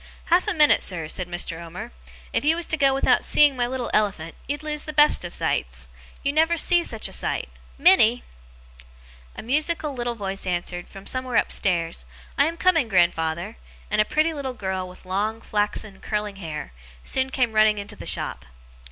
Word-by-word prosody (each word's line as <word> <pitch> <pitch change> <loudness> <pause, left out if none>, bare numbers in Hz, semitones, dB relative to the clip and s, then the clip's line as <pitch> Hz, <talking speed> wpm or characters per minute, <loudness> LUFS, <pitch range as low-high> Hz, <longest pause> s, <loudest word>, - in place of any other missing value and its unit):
'Half 355 +2 +4
a - - +1
minute, 300 -2 +5
sir,' 165 -4 0
said 180 +3 -2
Mr. 175 -1 -3
Omer. 170 +1 -8 0.4
'If - - 0
you 310 +3 +4
was 340 0 0
to - - +1
go 275 -3 +4
without 270 - +2
seeing 295 -2 +5
my 245 -1 0
little 255 -1 -4
elephant, 190 -6 0
you'd 290 +2 -3
lose 300 -1 -3
the 305 - -6
best 295 -6 +5
of 175 - -5
sights. - - -2 0.4
You 280 - 0
never 325 +2 +3
see 345 +1 +3
such - - -3
a - - -8
sight! - - -2 0.3
Minnie!' 245 -10 +5 1.1
A - - -8
musical 300 +4 0
little 240 -2 -3
voice 195 -3 -4
answered, 175 0 -3
from 195 0 -12
somewhere 255 -1 -2
upstairs, 170 -7 0 0.3
'I 285 - +5
am 335 +1 -4
coming, 335 -9 +3
grandfather!' 175 +1 +1 0.3
and 210 +1 +3
a - - +1
pretty 315 +5 +1
little 270 -4 -5
girl 190 -3 -3
with 180 +1 -15
long, 205 +4 -1
flaxen, 210 -2 -2
curling 210 -2 -3
hair, 155 - -7 0.3
soon 260 0 0
came 250 -4 0
running 215 0 +4
into 200 0 -7
the - - -9
shop. - - -2
220 Hz, 185 wpm, -24 LUFS, 185-290 Hz, 1.1 s, minute